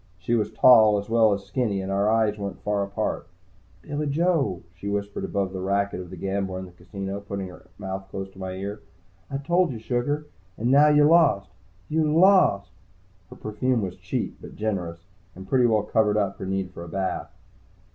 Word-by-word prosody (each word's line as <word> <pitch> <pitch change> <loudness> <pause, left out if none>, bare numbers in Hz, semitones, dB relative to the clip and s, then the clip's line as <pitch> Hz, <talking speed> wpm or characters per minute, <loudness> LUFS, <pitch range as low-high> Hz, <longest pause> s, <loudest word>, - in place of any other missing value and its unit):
She 95 +6 -2
was 105 -3 +1
tall, 110 -4 +7
as 100 +1 -5
well 115 -2 +5
as 100 -1 -1
skinny, 110 -7 -1
and 95 0 -4
our 100 +2 +2
eyes 110 -1 +2
weren't 100 -2 -6
far 105 -1 0
apart. 100 -3 -3 0.6
"Billy 150 0 -3
Joe," 145 - +1
she 95 +3 -6
whispered 100 0 -3
above 95 -1 -2
the 95 - -4
racket 100 0 0
of 90 -1 -8
the 95 - -9
gambler 95 +1 -2
in 95 - -5
the 90 - -13
casino, 95 +2 -6
putting 100 -2 -5
her 90 - -14
mouth 95 -1 -6
close 95 0 -5
to 95 - -16
my 95 -1 -4
ear. 100 +2 -5 0.5
"I 135 - -2
told 175 +4 +1
you, 120 - -5
sugar. 125 +6 -1 0.3
And 120 +3 0
now 145 +2 +7
you 150 0 +5
lost. 150 - +4 0.4
You 155 -1 +1
lost!" 175 - +4 0.6
Her - - -11
perfume 115 +2 -1
was 90 -1 -4
cheap, - - -4
but - - -11
generous, 90 -6 -3 0.3
and 95 +1 -10
pretty 125 +1 +4
well 110 -3 +2
covered 105 -1 +2
up 100 -2 0
her 95 - -5
need 95 -1 -2
for 85 - -9
a 85 - -9
bath. 95 +2 -3
100 Hz, 195 wpm, -25 LUFS, 95-125 Hz, 0.6 s, tall